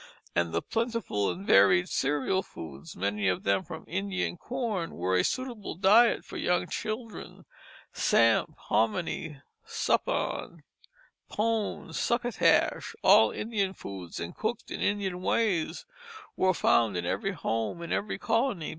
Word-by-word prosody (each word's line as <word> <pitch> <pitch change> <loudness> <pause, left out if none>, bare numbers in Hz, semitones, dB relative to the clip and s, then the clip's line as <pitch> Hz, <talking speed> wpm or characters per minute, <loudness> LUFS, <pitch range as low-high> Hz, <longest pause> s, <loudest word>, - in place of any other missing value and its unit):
And 85 -1 +1
the - - -1
plentiful 225 - -1
and 190 +3 -5
varied 175 - +5
cereal 145 +7 0
foods, 80 - -10
many 100 +1 -1
of 90 -1 0
them 100 - +2
from 160 -2 -9
Indian 190 0 -2
corn, 220 -5 -3
were 90 +2 0
a 90 - +3
suitable 245 -8 -3
diet 210 +7 +5
for - - -8
young 180 0 +1
children. 215 +4 -6 0.5
Samp, 115 -1 +3
hominy, 135 - -1 0.2
suppawn, - - -1 0.7
pone, 220 0 -1
succotash, 240 0 +1
all - - +7
Indian 200 -4 -2
foods 95 -4 -8
and 85 0 -6
cooked 220 +1 -3
in - - -4
Indian 195 -3 -1
ways, 185 -5 0 0.5
were 185 -1 +2
found 115 - +3
in 85 - -3
every 195 - -1
home 115 - -2
in 170 - -6
every 205 - -2
colony. 225 - 0
180 Hz, 130 wpm, -28 LUFS, -, 0.7 s, all